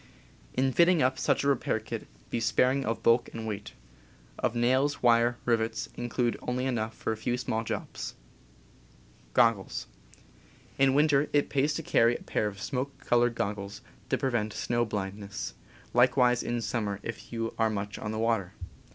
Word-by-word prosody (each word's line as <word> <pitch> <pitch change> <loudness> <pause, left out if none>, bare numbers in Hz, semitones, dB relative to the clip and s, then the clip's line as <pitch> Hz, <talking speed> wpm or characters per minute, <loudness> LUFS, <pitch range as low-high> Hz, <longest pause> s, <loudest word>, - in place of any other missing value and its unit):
In 130 +1 +2
fitting 170 -1 +5
up 130 0 +1
such - - +1
a - - +1
repair 135 -5 +1
kit, 110 - -6 0.2
be - - 0
sparing 125 +4 +2
of 115 +1 -2
bulk 115 +1 +4
and 115 -1 -5
weight. 105 -1 -5 0.7
Of 115 - 0
nails, 130 +5 +2
wire, 120 0 +4
rivets, 115 -2 0
include 120 0 -1
only 125 +1 -2
enough 110 -4 -1
for - - -2
a - - -6
few 120 +2 -1
small 125 -3 -2
jobs. - - -5 1.2
In 100 - -1
winter 145 -1 +4
it 145 -1 +2
pays 145 +2 +1
to 165 - -3
carry 120 -4 +4
a - - -7
pair 105 - 0
of 100 -1 -6
smoke 135 +5 -3
colored 120 0 +3
goggles, 100 -1 -3 0.3
to - - +2
prevent 120 -5 -1
snow 120 0 0
blindness 100 -1 -4 0.2
— - - -25
likewise 125 0 +4
in 120 0 -2
sum 115 0 -1
mer 100 -1 -3
if 115 -1 -7
you 115 -1 -3
are 110 0 +3
much 100 -1 -4
on 105 - -4
the 110 - -3
water. 110 -5 0
120 Hz, 170 wpm, -29 LUFS, 110-130 Hz, 1.2 s, fitting